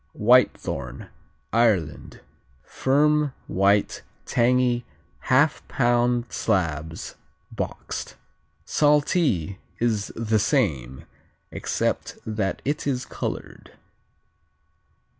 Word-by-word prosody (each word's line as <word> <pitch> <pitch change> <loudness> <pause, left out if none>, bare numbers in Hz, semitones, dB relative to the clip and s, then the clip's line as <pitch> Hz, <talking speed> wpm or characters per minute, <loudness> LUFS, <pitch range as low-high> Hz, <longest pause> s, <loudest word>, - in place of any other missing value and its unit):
Whitethorn 105 - +2 0.4
Ireland 105 - +1 0.4
Firm; 150 +1 +2
white; 100 +2 +2 0.2
tangy; 125 0 +2 0.4
half 145 +4 +2
pound 120 -1 +2
slabs 80 -6 -2 0.4
boxed. - - -5 0.5
Saltee 145 - +2 0.2
is 110 -3 0
the 110 -1 +1
same, 80 - 0 0.5
except - - -2
that 110 -3 -2
it 145 +1 -1
is 130 -2 -1
colored. - - -6
115 Hz, 70 wpm, -24 LUFS, 95-130 Hz, 0.5 s, Whitethorn